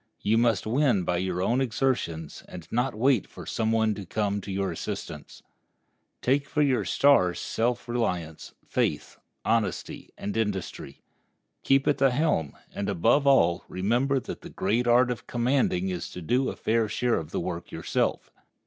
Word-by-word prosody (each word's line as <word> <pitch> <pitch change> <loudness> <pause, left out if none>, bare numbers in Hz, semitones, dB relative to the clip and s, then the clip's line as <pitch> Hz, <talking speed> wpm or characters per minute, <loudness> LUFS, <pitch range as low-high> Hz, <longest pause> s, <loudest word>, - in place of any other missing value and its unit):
You 110 +2 +2
must 115 -5 +2
win 120 -4 +2
by 90 0 0
your 90 0 -1
own 120 +6 +1
exertions, 110 - -1
and 85 -3 -10
not 120 0 0
wait 125 0 +2
for - - -11
some 110 -1 -1
one 110 -1 +2
to 100 - -7
come 100 +2 -1
to 100 - -7
your 95 -1 -1
assistance. 80 - -7 0.8
Take 140 +3 +2
for 150 -1 +2
your 130 -8 +1
star 90 -4 +4
self 120 +1 -1
reliance, 90 -10 -3
faith, - - -1 0.3
honesty, 115 -1 -1
and 100 - -4
industry. 100 -10 -3 0.6
Keep 135 0 +2
at 145 - +2
the 135 - +5
helm, 125 - 0 0.2
and, 100 - -3
above 115 - +2
all, 90 -11 +4
remember 120 +9 +1
that - - -8
the - - -9
great 115 +6 0
art 125 +1 +4
of 120 - -6
commanding 120 -7 +1
is 90 -2 -4
to 90 - -8
do 125 +10 +1
a - - -5
fair 110 -1 0
share 120 +3 +1
of 80 - -8
the - - -2
work - - -5
yourself. - - -1
110 Hz, 165 wpm, -27 LUFS, 95-125 Hz, 0.8 s, the